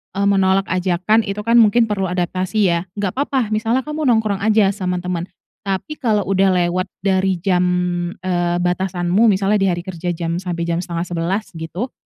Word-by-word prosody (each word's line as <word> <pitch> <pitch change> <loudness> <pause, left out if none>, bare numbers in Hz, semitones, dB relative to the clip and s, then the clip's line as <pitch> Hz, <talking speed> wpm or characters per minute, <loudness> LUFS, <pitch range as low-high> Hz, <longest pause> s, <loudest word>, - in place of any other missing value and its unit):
eee, 200 +1 +1
menolak 195 0 +3
ajakan, 185 +4 +2
itu 200 +1 -3
kan, 230 +1 +4
mungkin 230 +1 +5
perlu 195 -2 -1
adaptasi, 185 +3 -2
ya, 170 0 +1 0.2
nggak 200 -3 -1
papa, 265 -6 0
misalnya 225 +4 0
kamu 300 0 -3
nongkrong 220 -5 +2
aja 210 -1 +3
sama 180 -3 -3
teman. 180 -1 -3 0.4
Tapi, 195 +11 -3
kalau 215 -5 +1
udah 190 -1 +3
lewat 185 +2 -1 0.2
dari 190 -1 +2
jam, 180 -2 +2 0.6
eee, 175 -1 0
batasanmu 180 +3 +1
misalnya 200 0 +2
di 195 - +2
hari 175 -1 0
kerja 175 -1 -4
jam 170 +1 -2
sampai 175 -2 -3
jam 170 0 -1
10.30, 175 +3 -2
gitu. 170 +9 -5
190 Hz, 170 wpm, -19 LUFS, 175-210 Hz, 0.6 s, mungkin